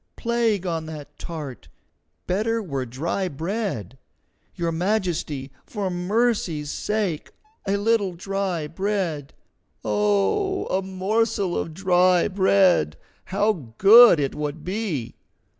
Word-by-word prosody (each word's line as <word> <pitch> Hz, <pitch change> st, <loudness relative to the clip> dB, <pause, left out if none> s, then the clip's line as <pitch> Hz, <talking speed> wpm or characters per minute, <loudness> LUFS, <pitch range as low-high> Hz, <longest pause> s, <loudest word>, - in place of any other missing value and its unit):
Plague 230 Hz, -5 st, 0 dB
on 165 Hz, -3 st, -2 dB
that 150 Hz, -2 st, -9 dB
tart! 150 Hz, -8 st, -7 dB, 0.6 s
Better 220 Hz, +5 st, 0 dB
were 140 Hz, -, -4 dB
dry 165 Hz, +10 st, -2 dB
bread. 160 Hz, -, -4 dB, 0.6 s
Your 170 Hz, -1 st, -1 dB
Majesty, 165 Hz, -7 st, -1 dB
for 200 Hz, -4 st, -4 dB
mercy's 180 Hz, -5 st, 0 dB
sake, 205 Hz, -7 st, -2 dB, 0.4 s
a 200 Hz, +1 st, +2 dB
little 205 Hz, -2 st, +1 dB
dry 190 Hz, -2 st, -2 dB
bread! 170 Hz, -4 st, -3 dB, 0.5 s
Oh, 210 Hz, -, +1 dB
a 190 Hz, -, +1 dB
morsel 190 Hz, 0 st, 0 dB
of 160 Hz, -, -3 dB
dry 180 Hz, -1 st, +3 dB
bread, 190 Hz, -, +3 dB, 0.3 s
how 185 Hz, -, -1 dB
good 220 Hz, -2 st, +8 dB
it 140 Hz, -2 st, -1 dB
would 150 Hz, +1 st, -5 dB
be!" 180 Hz, -, -3 dB
185 Hz, 110 wpm, -24 LUFS, 155-205 Hz, 0.6 s, good